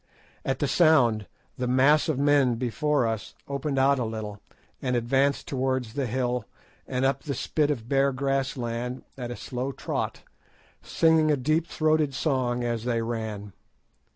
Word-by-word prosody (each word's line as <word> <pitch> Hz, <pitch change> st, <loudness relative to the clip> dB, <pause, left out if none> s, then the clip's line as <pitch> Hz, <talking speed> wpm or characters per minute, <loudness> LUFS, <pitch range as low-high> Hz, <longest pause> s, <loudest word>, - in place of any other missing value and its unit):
At -, -, -1 dB
the -, -, 0 dB
sound, 125 Hz, -, +4 dB, 0.3 s
the 125 Hz, -, -1 dB
mass 135 Hz, +6 st, +4 dB
of 155 Hz, -, 0 dB
men 140 Hz, -3 st, +3 dB
before 130 Hz, +3 st, 0 dB
us 110 Hz, -2 st, -3 dB
opened 140 Hz, 0 st, -2 dB
out 135 Hz, +1 st, +4 dB
a -, -, 0 dB
little, 110 Hz, -2 st, -5 dB, 0.4 s
and 125 Hz, -1 st, 0 dB
advanced 135 Hz, +4 st, +1 dB
towards 130 Hz, -3 st, -1 dB
the 140 Hz, -1 st, -1 dB
hill 125 Hz, 0 st, -1 dB, 0.4 s
and 130 Hz, 0 st, 0 dB
up 135 Hz, 0 st, +1 dB
the 140 Hz, -3 st, -4 dB
spit 150 Hz, +4 st, 0 dB
of 120 Hz, -6 st, -2 dB
bare 140 Hz, +1 st, +3 dB
grass 135 Hz, +1 st, -1 dB
land 120 Hz, +1 st, -4 dB
at 125 Hz, -3 st, -5 dB
a 120 Hz, -, -4 dB
slow 130 Hz, +3 st, -4 dB
trot, -, -, -4 dB, 0.6 s
singing 160 Hz, -1 st, +3 dB
a 150 Hz, -, +3 dB
deep 155 Hz, +5 st, +1 dB
throated 155 Hz, -4 st, +1 dB
song 125 Hz, -4 st, 0 dB
as 120 Hz, -2 st, -2 dB
they 115 Hz, -2 st, 0 dB
ran. 110 Hz, -4 st, -4 dB
130 Hz, 160 wpm, -26 LUFS, 120-140 Hz, 0.6 s, sound